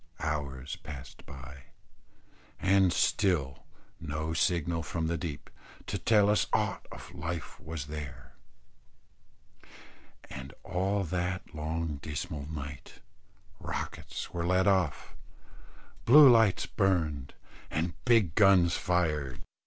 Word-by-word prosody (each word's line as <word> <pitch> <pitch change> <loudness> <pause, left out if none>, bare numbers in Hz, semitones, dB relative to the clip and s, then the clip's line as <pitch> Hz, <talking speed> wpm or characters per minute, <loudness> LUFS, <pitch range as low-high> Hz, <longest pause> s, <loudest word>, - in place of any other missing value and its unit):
Hours 70 -2 -3
passed 70 -4 -10
by, 65 0 -11 0.9
and 95 -1 +4
still 85 -10 +1 0.3
no 80 +2 -3
signal 85 -1 +1
from 80 +2 -3
the 85 +1 0
deep, 80 -5 -5 0.4
to - - -3
tell 105 -2 +4
us 105 0 +3
aught - - 0
of - - -10
life 85 -1 -5
was 80 -3 -6
there; 75 -3 -8 1.9
and 70 0 -9
all 95 +3 0
that 90 +1 -3
long 80 0 -3
dismal 75 0 -5
night, 75 -2 -7 0.6
rockets - - -5
were 85 -1 -2
let 95 +1 +3
off, 95 -7 +1 0.9
bluelights 120 -7 +7
burned, 80 -8 0 0.3
and 80 +3 -1
big 115 -9 +4
guns 95 -3 +5
fired. 75 -8 -1
80 Hz, 105 wpm, -30 LUFS, 75-95 Hz, 1.9 s, bluelights